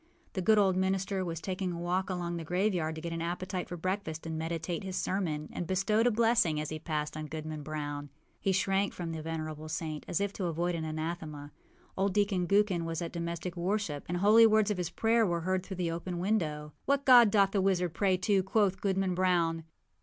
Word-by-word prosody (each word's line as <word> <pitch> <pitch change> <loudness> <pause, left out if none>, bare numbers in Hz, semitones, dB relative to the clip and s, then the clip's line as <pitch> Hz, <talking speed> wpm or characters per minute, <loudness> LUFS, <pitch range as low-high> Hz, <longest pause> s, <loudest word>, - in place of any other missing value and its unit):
The 190 - -2
good 215 +4 +4
old 195 -3 +4
minister 190 +1 0
was 165 -3 -4
taking 185 +1 -3
a 170 - -5
walk 180 +3 -1
along 175 -2 -2
the 165 - -5
graveyard 180 -2 0
to 160 - -7
get 170 0 -4
an 165 - -3
appetite 180 +2 -3
for 175 - -5
breakfast 180 -3 -3
and 160 -1 -3
meditate 165 +2 -3
his 190 -1 -5
sermon, 160 -7 -1
and 175 - -4
bestowed 210 +5 +2
a - - +4
blessing, 225 -8 +3
as 150 - -3
he 155 - -4
passed, 150 -2 -3
on 155 0 -5
Goodman 155 0 -5
Brown. 145 -1 -5 0.3
He 195 - +1
shrank 195 +1 +1
from 170 -2 -5
the 160 -1 -4
venerable 155 -1 -5
saint 155 -1 -4
as - - 0
if 200 0 -1
to 190 - -3
avoid 175 +1 -1
an 165 -1 -3
anathema. 155 -2 -5 0.4
Old 195 0 0
Deacon 200 -4 +1
Gookin 200 -3 +2
was 165 -1 -3
at 170 -2 -5
domestic 170 +1 -4
worship, 175 -4 -1
and 175 - -2
the 175 - -2
holy 220 +3 +7
words 215 -1 +3
of 205 - -1
his 175 -1 -1
prayer 225 +5 +2
were 170 -5 0
heard 185 +1 0
through 190 -1 -7
the 175 -2 -1
open 175 +2 -4
window. 160 -6 -1 0.2
âWhat 280 0 +2
God 245 -4 +8
doth 200 -1 +4
the 195 - +1
wizard 180 -3 +1
pray 190 +2 +2
to?â 190 +1 +2
quoth 195 -1 +1
Goodman 195 -2 +1
Brown. 170 -3 +1
180 Hz, 220 wpm, -31 LUFS, 160-195 Hz, 0.4 s, God